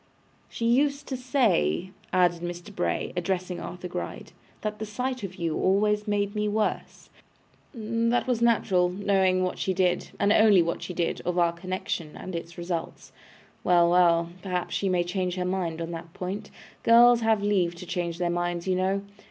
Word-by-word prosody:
She 230 - -4
used 280 +4 +2
to 265 - -2
say,' 225 - +1 0.2
added 175 -2 +2
Mr. 175 +3 -7
Bray, - - -1
addressing 180 0 -2
Arthur 180 0 -6
Gride, 175 - -6 0.3
'that 210 0 -4
the 220 - -3
sight 250 +4 -3
of 190 -2 -6
you 165 -3 -2
always 210 +2 +2
made 205 -1 0
me 210 -1 -1
worse. 215 +1 -2 0.6
That 230 0 0
was 245 -2 0
natural, 195 -6 +3
knowing 190 -1 +2
what 185 - -2
she 190 - -1
did, 180 -1 +1
and 205 +1 +4
only 210 -6 +6
what 170 0 -3
she 180 - -6
did, 170 - -1
of 180 0 -2
our 170 -1 +3
connection 170 -3 -4
and 185 - -7
its 170 +1 -7
results. 170 -1 -5 0.5
Well, 175 -1 +4
well. 170 -1 +4
Perhaps 180 -2 -3
she 195 - 0
may 180 -1 +2
change 180 0 -2
her 180 -1 -2
mind 180 -3 -2
on 165 0 -4
that 165 0 -8
point; 195 +3 -5 0.3
girls 235 +1 +6
have 220 -2 +2
leave 185 -4 +1
to 175 - -9
change 175 -2 -3
their 175 -1 0
minds, 175 0 -2
you 185 - +2
know. 190 +2 0
185 Hz, 175 wpm, -26 LUFS, 175-210 Hz, 0.6 s, only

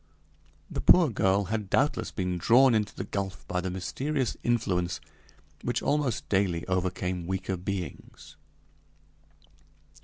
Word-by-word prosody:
The - - -3
poor 170 -7 +6
girl 100 -1 +2
had 105 0 -3
doubtless 145 +8 +1
been 90 -2 -2
drawn 120 +7 +6
into 105 -2 0
the - - -4
gulf 95 -4 -4
by 90 0 -1
the 95 - -3
mysterious 130 +9 -2
influence 90 -7 0 0.6
which - - -2
almost 145 -6 0
daily 95 -4 0
overcame 90 -1 -1
weaker 95 0 -2
beings! 95 0 -6
95 Hz, 120 wpm, -28 LUFS, 90-115 Hz, 0.6 s, poor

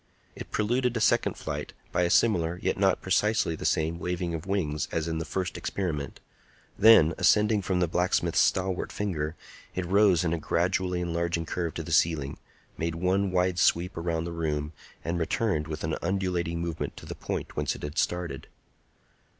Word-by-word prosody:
It - - -8
preluded 120 +3 0
a - - 0
second 110 - +2
flight - - -5 0.2
by - - +1
a 85 - +2
similar, 85 -5 +3
yet - - +1
not 95 -1 +2
precisely 95 -2 +2
the - - -7
same, 80 +2 0
waving 90 -1 -2
of 80 +3 -5
wings 75 -7 -1
as 80 0 -1
in 80 -1 -2
the 80 - -3
first 90 +1 -3
experiment; 75 -8 -3 0.6
then, 100 -7 +7
ascending 105 0 +4
from 95 -1 0
the 90 - +3
blacksmith's 90 +2 +1
stalwart 95 -1 +1
finger, 80 -6 -2 0.4
it 95 - -2
rose 95 -1 +4
in 85 -1 0
a 85 - -1
gradually 90 +2 0
enlarging 85 -1 -1
curve 85 -1 -3
to - - -3
the - - -7
ceiling, 75 -5 +1 0.4
made 80 0 -1
one 95 +3 +1
wide 90 0 +1
sweep 90 +3 +2
around 85 -1 -1
the 85 - -5
room, 75 -2 -2 0.3
and 85 +2 -1
returned 80 -2 0
with 80 -1 -5
an 80 0 -1
undulating 90 -3 -1
movement 85 -1 -4
to - - -10
the - - -6
point - - -5
whence - - -1
it - - -11
had 75 +1 -3
started. 90 -1 -2
85 Hz, 180 wpm, -28 LUFS, 80-95 Hz, 0.6 s, then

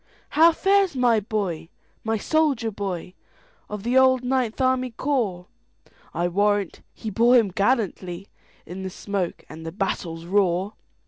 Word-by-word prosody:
"How 325 +3 +6
fares 390 0 +2
my 245 -3 +3
boy,—my 205 +1 -4
soldier 275 -3 +1
boy, 185 -3 -5 0.6
Of 210 -1 -6
the 245 +3 +3
old 260 -1 +4
Ninth 250 -3 -1
Army 255 -1 +1
Corps?I 180 - -4
warrant 205 +1 0
he 220 - -7
bore 235 +5 +4
him 225 -6 +4
gallantlyIn 195 -4 -1 0.6
the 190 - -4
smoke 190 -1 -4
and 160 - -10
the 165 - -5
battle's 170 -3 -3
roar!" 190 +1 +1
210 Hz, 125 wpm, -24 LUFS, 185-255 Hz, 0.6 s, How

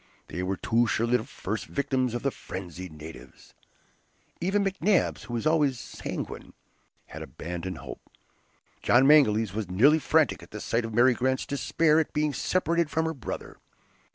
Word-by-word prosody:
They 90 - -4
were 95 +1 -2
too 120 +1 +2
surely 115 +2 +2
the 110 - -5
first 105 +4 -5
victims 130 -3 -1
of 120 - -4
the 140 - +1
frenzied 90 -4 -8
natives. 75 -4 -12 0.9
Even 200 +3 +1
McNabbs, 195 - +1
who 120 +2 -5
was 115 - -3
always 150 -5 +3
sanguine, - - -6 0.5
had - - -9
abandoned 90 +1 -6
hope. - - -9 0.8
John 125 +2 +5
Mangles 115 -8 +5
was 105 -3 -3
nearly 135 +13 +5
frantic 155 -3 +2
at - - -13
the 105 - -7
sight 115 +2 -1
of 115 - -6
Mary 125 +2 +6
Grant's 130 +2 0
despair 155 +2 +2
at 160 - -2
being 150 -1 0
separated 170 -2 0
from 160 +1 0
her 160 - -1
brother. 135 - -7
125 Hz, 160 wpm, -27 LUFS, 105-155 Hz, 0.9 s, Mary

